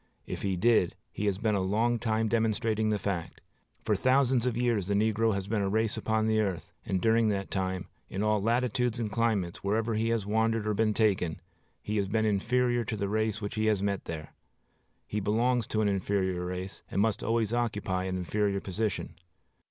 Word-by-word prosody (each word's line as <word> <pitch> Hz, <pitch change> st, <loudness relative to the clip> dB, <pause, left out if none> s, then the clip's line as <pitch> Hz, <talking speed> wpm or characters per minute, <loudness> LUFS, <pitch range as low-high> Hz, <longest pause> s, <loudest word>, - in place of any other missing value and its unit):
If -, -, -5 dB
he 95 Hz, -1 st, 0 dB
did, 100 Hz, -1 st, +3 dB, 0.2 s
he 105 Hz, -, -2 dB
has 100 Hz, -2 st, +1 dB
been 110 Hz, +1 st, 0 dB
a 100 Hz, -, +2 dB
long 115 Hz, +5 st, +1 dB
time 110 Hz, 0 st, 0 dB
demonstrating 110 Hz, -1 st, +1 dB
the 105 Hz, -, +1 dB
fact. 95 Hz, -5 st, -3 dB, 0.4 s
For -, -, +2 dB
thousands 130 Hz, -1 st, +3 dB
of 120 Hz, -2 st, -1 dB
years 120 Hz, -6 st, +1 dB
the 100 Hz, -, +1 dB
negro 110 Hz, +1 st, +2 dB
has 100 Hz, -1 st, -3 dB
been 105 Hz, 0 st, 0 dB
a 100 Hz, -, 0 dB
race 110 Hz, +1 st, +1 dB
upon 110 Hz, 0 st, 0 dB
the 110 Hz, 0 st, +2 dB
earth; 95 Hz, -5 st, -2 dB
and 95 Hz, -, -1 dB
during 115 Hz, +2 st, +3 dB
all 100 Hz, -, +1 dB
that 100 Hz, -, -7 dB
time, 95 Hz, -1 st, -2 dB, 0.2 s
in 95 Hz, -, -2 dB
all 105 Hz, -1 st, +2 dB
latitudes 120 Hz, +1 st, +1 dB
and 110 Hz, -3 st, -2 dB
climates, 105 Hz, -6 st, 0 dB
wherever 110 Hz, +3 st, 0 dB
he 110 Hz, +1 st, 0 dB
has 115 Hz, -3 st, 0 dB
wandered 110 Hz, +1 st, +1 dB
or 105 Hz, -, +1 dB
been 110 Hz, 0 st, +1 dB
taken, 95 Hz, -7 st, +1 dB, 0.4 s
he 105 Hz, +1 st, -2 dB
has 100 Hz, -1 st, +1 dB
been 110 Hz, +2 st, +1 dB
inferior 120 Hz, +4 st, +1 dB
to 110 Hz, -, -3 dB
the 100 Hz, -1 st, -1 dB
race 110 Hz, +1 st, 0 dB
which 100 Hz, -, -3 dB
he 110 Hz, 0 st, 0 dB
has 105 Hz, -3 st, +2 dB
there -, -, 0 dB, 0.2 s
met. 80 Hz, -2 st, -6 dB, 0.7 s
He 105 Hz, -, -2 dB
belongs 115 Hz, +4 st, +1 dB
to 110 Hz, -, 0 dB
an 105 Hz, -, +2 dB
inferior 95 Hz, -2 st, 0 dB
race, 90 Hz, +1 st, -5 dB
and -, -, -2 dB
must 110 Hz, +1 st, +1 dB
always 115 Hz, -1 st, 0 dB
occupy 105 Hz, -6 st, -1 dB
an 95 Hz, 0 st, -2 dB
inferior 100 Hz, +2 st, 0 dB
position. 100 Hz, +1 st, -3 dB
110 Hz, 205 wpm, -29 LUFS, 100-115 Hz, 0.7 s, did